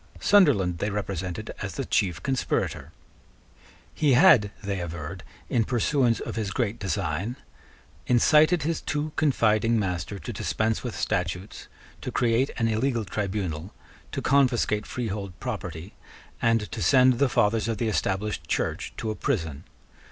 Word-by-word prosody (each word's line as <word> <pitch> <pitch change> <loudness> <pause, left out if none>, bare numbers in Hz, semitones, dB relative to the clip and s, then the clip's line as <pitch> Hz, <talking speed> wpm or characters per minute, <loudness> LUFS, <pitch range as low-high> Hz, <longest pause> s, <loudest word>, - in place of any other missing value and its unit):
Sunderland 115 - +4
they 105 - -1
represented 95 -4 -4
as - - -4
the - - -3
chief 90 -3 0
conspirator. 135 -2 -1 1.0
He 150 -3 +2
had, 125 - +6
they 100 -1 -2
averred, 85 +1 -6 0.3
in 120 -4 +2
pursuance 120 0 +1
of - - -5
his 110 -3 -1
great 115 +1 -2
design, 95 +3 -2 0.7
incited 155 +6 +4
his 165 +1 -1
too 150 +1 -2
confiding 115 -6 +2
master 95 0 -2
to 120 +4 -7
dispense 110 +2 -1
with 120 -3 -4
statutes, 90 +3 -3 0.3
to - - -4
create 120 +2 +2
an 115 - +1
illegal 115 0 0
tribunal, 95 -3 -3 0.4
to - - -4
confiscate 120 -6 +2
freehold 100 -6 -4
property, 85 +2 -5 0.5
and 115 -1 +3
to - - -5
send 130 -2 +5
the 140 - +3
fathers 115 -4 +2
of 115 -2 -1
the 115 - -1
Established 100 -5 -1
Church - - -2
to 110 - -2
a - - -4
prison. 80 - -2
110 Hz, 140 wpm, -26 LUFS, 95-125 Hz, 1.0 s, had